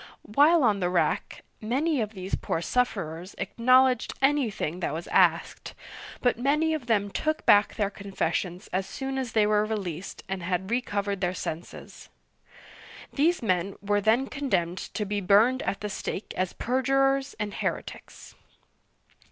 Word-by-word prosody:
While 295 +8 +4
on 210 -4 +3
the 180 -2 0
rack, 180 -1 -1 0.2
many 270 +6 0
of 215 0 -3
these 190 0 -7
poor - - -1
sufferers 180 -5 -2
acknowledged 255 +1 +3
anything 255 - 0
that 175 - -2
was 165 - -5
asked, - - +2 0.5
but 245 -2 +1
many 300 +5 +2
of 290 -6 -4
them 205 -3 +1
took 310 +7 -2
back 205 0 +5
their 205 -2 0
confessions 185 -3 -3
as 190 +1 -1
soon 270 +4 -4
as 250 -3 -4
they 215 -2 +4
were 210 0 +3
released 195 -5 -5
and 190 -1 -4
had 185 +3 -2
recovered 205 -5 -1
their 180 0 0
senses. 165 0 -7 1.0
These 320 +1 +2
men 185 -2 0
were 205 0 0
then 225 +6 +3
condemned 190 - -1 0.2
to 210 - -1
be 205 0 -2
burned 215 +7 +4
at 200 - -3
the 210 - -2
stake 200 - -5
as 185 -1 -1
perjurers 270 +2 +1
and 210 -1 -3
heretics. - - -5
210 Hz, 150 wpm, -27 LUFS, 190-260 Hz, 1.0 s, back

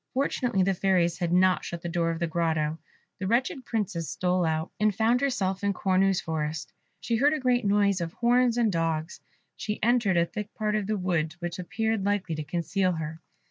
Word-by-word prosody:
Fortunately 250 -6 +1
the 195 +1 +2
fairies 180 -2 +1
had 175 -2 -1
not 185 +1 +4
shut 170 -1 -6
the - - -3
door 170 -1 0
of 165 - -2
the 170 - -1
grotto. 160 -1 -1 0.4
The 185 - -2
wretched 255 - 0
Princess 190 -8 -2
stole 180 -1 0
out, 160 +1 -1
and 210 -2 +2
found 230 +4 +2
herself 195 -8 -1
in 200 0 +2
Cornue's 190 0 +2
forest. 155 -1 -3 0.3
She 230 - 0
heard 285 +5 +4
a 310 - -1
great 250 -3 +1
noise 200 -2 +2
of 165 0 -4
horns 245 0 +2
and 230 -3 +3
dogs; 165 -1 -2 0.4
she 210 0 -3
entered 230 -6 +3
a 170 - +4
thick 210 +3 -6
part 215 -1 -1
of 210 -2 -1
the 215 0 0
wood 170 -4 -1
which 175 +1 -5
appeared 220 +3 -1
likely 200 -4 0
to 155 -1 -3
conceal 180 +4 0
her. 160 0 -5
190 Hz, 200 wpm, -27 LUFS, 170-215 Hz, 0.4 s, not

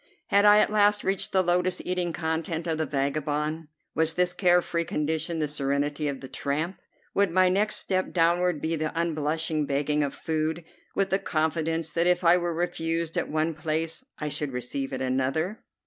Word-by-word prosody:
Had 200 +1 +4
I 210 0 +8
at 210 - +3
last 210 0 +3
reached 195 0 0
the 190 -1 +3
lotus 180 +1 +1
eating 180 -1 -1
content 160 +1 -2
of 160 -2 -1
the 160 - 0
vagabond? 150 +3 -1 0.3
Was 160 +1 +2
this 180 0 +2
care 180 -1 +4
free 170 -1 -1
condition 160 +2 -2
the 155 -1 0
serenity 145 +1 -1
of 140 -2 -4
the 135 - -7
tramp? 155 +8 -3 0.3
Would 200 -1 +3
my 185 +2 +4
next 205 +3 +2
step 185 -1 0
downward 175 -1 +2
be 160 +1 0
the 155 +1 -2
unblushing 155 -1 -1
begging 145 +2 0
of 140 - -3
food, 160 +1 -2 0.3
with 195 -1 +1
the 195 - +2
confidence 160 0 -1
that 170 +2 +1
if 180 0 +2
I 170 0 +6
were 175 -1 0
refused 165 -1 -2
at - - -1
one 155 +1 0
place 160 +6 -2
I 150 - -3
should 145 -2 -3
receive 125 +2 -4
at 130 0 -3
another? 135 - -1
160 Hz, 185 wpm, -26 LUFS, 150-180 Hz, 0.3 s, I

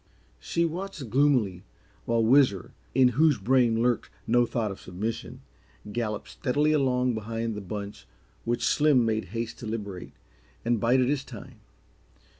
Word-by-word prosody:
She 170 - 0
watched 165 - -5
gloomily 125 -9 +2 0.4
while 115 -1 +1
Whizzer, 120 -5 +3 0.2
in 130 -1 +6
whose 150 +3 +3
brain 115 +1 +2
lurked 120 -2 0 0.2
no 120 +1 +3
thought 115 -3 -2
of 95 - -9
submission, 105 +5 -5 0.5
galloped 105 -1 -3
steadily 145 +3 0
along 125 -4 +2
behind 115 +1 -3
the 105 - -5
bunch 100 +1 -7 0.4
which 120 +1 -1
Slim 145 -5 +4
made 110 -1 0
haste 115 +4 -5
to 115 - -7
liberate, 100 -5 -6 0.5
and 120 -1 +1
bided 125 +3 +3
his 140 0 0
time. 125 -1 -11
120 Hz, 140 wpm, -27 LUFS, 110-130 Hz, 0.5 s, in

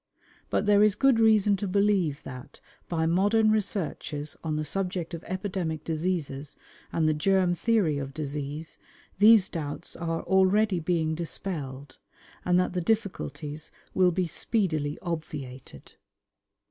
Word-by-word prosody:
But - - 0
there 205 0 +5
is 210 -1 +5
good 265 0 +4
reason 215 -2 +5
to 200 +1 -3
believe 190 -6 +1
that, 130 -1 -10 0.3
by 160 -2 0
modern 205 +6 +3
researches 175 -8 -2
on 155 -2 -1
the 155 - -1
subject 180 +1 -3
of 170 - -6
epidemic 185 -4 -3
diseases 155 -4 -2 0.4
and 160 -1 +1
the 155 - +3
germ 185 +3 +2
theory 175 -6 +1
of 135 -1 -5
disease, 150 +1 -5 0.4
these 210 -2 +7
doubts 150 -4 -5
are 165 -1 -3
already 190 +1 +3
being 160 -1 0
dispelled, 150 -5 -5 0.4
and 180 0 +3
that 180 0 0
the 180 - -1
difficulties 160 -7 -2 0.2
will 185 -1 +4
be 180 +1 0
speedily 160 -5 -1
obviated. 150 -7 -6
175 Hz, 135 wpm, -27 LUFS, 155-195 Hz, 0.4 s, these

